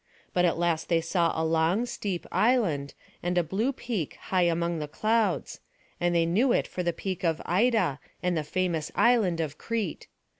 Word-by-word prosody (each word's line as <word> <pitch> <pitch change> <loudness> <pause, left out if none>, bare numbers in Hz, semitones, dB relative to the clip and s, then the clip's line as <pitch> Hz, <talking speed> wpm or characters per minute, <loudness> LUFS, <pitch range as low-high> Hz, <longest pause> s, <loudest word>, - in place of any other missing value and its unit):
But 180 0 +3
at 170 - +1
last 170 -2 0
they 170 -1 +3
saw 165 +1 +1
a 160 - +1
long 165 +7 +2
steep 195 -7 -4
island, 180 - +1 0.3
and 175 +1 -1
a 175 - +4
blue 200 - 0
peak 235 - -4
high 185 -2 0
among 170 0 -1
the 150 - -4
clouds; 220 +8 0 0.4
and 175 0 +1
they 165 -1 +3
knew 220 +10 +2
it - - +2
for 180 - -4
the 175 -1 +1
peak 185 +1 -5
of 165 -2 +1
Ida, 195 - +2 0.2
and 180 -1 +1
the 155 - 0
famous 165 -1 -1
land 220 -8 +3
of 155 -2 -3
Crete. 220 -8 -3
175 Hz, 185 wpm, -27 LUFS, 165-210 Hz, 0.4 s, a